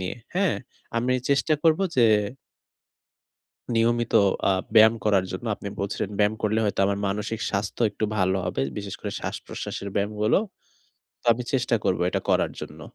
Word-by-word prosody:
নিয়ে 90 +4 -3 0.2
হ্যাঁ 190 -2 +2 0.4
আমি 125 +2 +1 0.2
চেষ্টা 140 +2 +3
করব 160 +2 +4 0.2
যে 120 - +6 1.7
নিয়মিত 120 0 +1 0.4
আ - - +4 0.2
ব্যায়াম 110 +1 +8
করার 100 -3 +3
জন্য 95 +6 -5
আপনি 100 - -7
বলছিলেন 100 0 -2
ব্যায়াম 105 +1 +3
করলে 110 +1 +1
হয়তো 100 -1 0
আমার 100 0 0
মানসিক 105 +3 -3
স্বাস্থ্য 100 +3 -2
একটু 105 +2 -3
ভালো 95 -1 +2
হবে। 80 -7 -1 0.2
বিশেষ 100 -1 -5
করে - - -4
শ্বাসপ্রশ্বাসের 100 - -5
ব্যায়ামগুলো। 105 +1 +1 0.8
তো - - -16
আমি 125 +2 -4
চেষ্টা 125 -3 +2
করব 90 - +1
এটা - - -1
করার - - +2
জন্য। - - -9
105 Hz, 155 wpm, -25 LUFS, 100-120 Hz, 1.7 s, ব্যায়াম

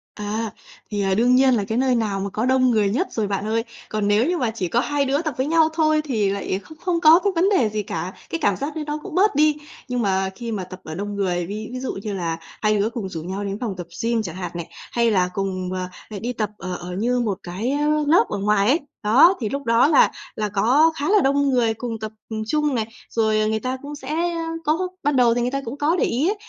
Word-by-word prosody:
À, 210 +1 -3 0.4
thì, 205 -1 -2
ờ, 195 -1 +1
đương 245 +3 +4
nhiên 260 0 +5
là 215 - +1
cái 220 +3 -2
nơi 255 -1 +2
nào 210 -4 0
mà 195 +1 -3
có 220 +5 -2
đông 260 0 +3
người 210 -3 +2
nhất 270 - 0
rồi 215 -3 -1
bạn 200 +1 -2
ơi. 225 +1 0 0.3
Còn 210 -1 -1
nếu 210 +3 +3
như 355 0 +1
mà 240 -4 0
chỉ 190 -5 -3
có 235 - +1
hai 285 +1 0
đứa 280 +4 +1
tập 310 -4 -3
với 260 - 0
nhau 320 0 +4
thôi, 310 -1 +3
thì 215 -8 +1
lại 195 -1 -2
không 315 - -14
không 350 -2 -1
có 320 +2 +8
cái 400 -2 +1
vấn 365 +4 +3
đề 265 - +3
gì 210 0 -2
cả, 175 +1 -4 0.2
cái 330 - -3
cảm 205 - +2
giác 290 +3 -4
đấy 310 - -3
nó 295 - -2
cũng 360 -4 -7
bớt 390 -4 +3
đi. 300 0 +4 0.3
Nhưng 250 -1 -1
mà 190 -2 +1
khi 235 -1 -5
mà 200 -4 -3
tập 185 +1 -10
ở 160 0 -7
đông 205 +2 -4
người, 180 -3 0
ví 215 +3 -6
ví 255 - -4
dụ 260 - -3
như 210 - -3
là 170 -4 -2 0.2
hai 215 -1 +2
đứa 205 +2 +1
cùng 220 -5 -5
rủ 165 -3 -5
nhau 190 +3 -4
đến 200 +1 -4
phòng 225 -6 -3
tập 175 -1 -6 0.2
gym 230 -1 +1
chẳng 175 -4 -6
hạn 180 -2 -5
này, 170 -1 -5 0.2
hay 235 -1 +2
là 180 -2 +2
cùng, 185 -2 -2
à, 185 0 -3 0.2
à, 210 - -6
đi 245 +2 -2
tập 215 -3 -2
ở 185 -1 -5
ở 175 +1 -8
như 245 +5 +1
một 210 -6 -1
cái, 195 +9 -3
a, 295 +1 +1 0.2
lớp 330 +4 +5
ở 205 - -2
ngoài 205 0 +2
ấy, 295 +7 +4 0.2
đó, 270 - +6
thì 215 - -1
lúc 280 0 -3
đó 230 +4 +4
là 305 - +5 0.2
là 210 -1 -2
có 255 +11 +4
khá 290 +4 -2
là 415 -2 +5
đông 280 +1 +2
người 235 -4 +2
cùng 225 -1 -5
tập, 215 0 -5 0.2
ừm, 220 -1 -3
chung 300 +1 +1
này. 220 -2 -1 0.2
Rồi 215 -1 +1
người 220 0 0
ta 255 +2 -3
cũng 290 +1 -7
sẽ, 265 -2 -11
a, 335 -1 -1 0.2
có 325 +5 +1 0.2
ban 290 -1 +1
đầu 240 -2 +5
thì 245 - 0
người 245 +1 0
ta 275 0 -2
cũng 250 +5 -5
có 305 +4 +2
để - - +2
ý 270 +8 0
á, - - +2
230 Hz, 275 wpm, -22 LUFS, 200-285 Hz, 0.4 s, có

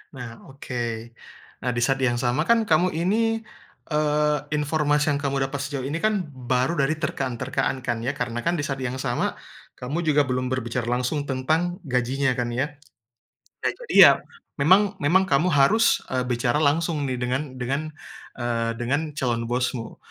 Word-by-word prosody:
Nah, 120 -3 -8
oke. 120 -4 -5 0.5
Nah, 125 - -1
di 120 - 0
saat 135 +1 +1
yang 125 -2 +2
sama 130 +6 0
kan 230 -1 +4
kamu 180 -2 +2
ini, 225 +6 +1 0.5
eee, 150 0 +2 0.2
informasi 150 0 +1
yang 140 - 0
kamu 140 -1 0
dapat 140 - -4
sejauh 140 -1 -4
ini 145 +5 -2
kan 210 0 +1
baru 130 +4 -1
dari 140 +3 +2
terkaan-terkaan 130 -3 -2
kan, 120 -1 -1
ya. 130 - -1
Karena 120 0 -3
kan 170 - +2
di 150 - -2
saat 135 -1 -3
yang 130 -1 -3
sama, 120 -2 -1 0.4
kamu 135 +7 -4
juga 150 -1 +4
belum 130 -1 -1
berbicara 125 -2 -2
langsung 125 +4 -1
tentang 160 +7 -1
gajinya 130 0 0
kan, 120 -1 -1
ya. 135 +4 +1 1.0
Nah, - - +3
itu - - -13
dia. - - +8 0.4
Memang 195 +6 +5
memang 185 +7 +4
kamu 155 +3 +2
harus, 185 +11 +4
eee, 130 - +1
bicara 120 +4 +1
langsung 155 +1 +1
nih 130 - -2
dengan 125 +2 -1 0.2
dengan, 135 +5 -2 0.5
eee, 115 -2 -1
dengan 140 +6 -1
calon 120 -3 -1
bosmu. 125 -1 -2
135 Hz, 165 wpm, -24 LUFS, 125-155 Hz, 1.0 s, dia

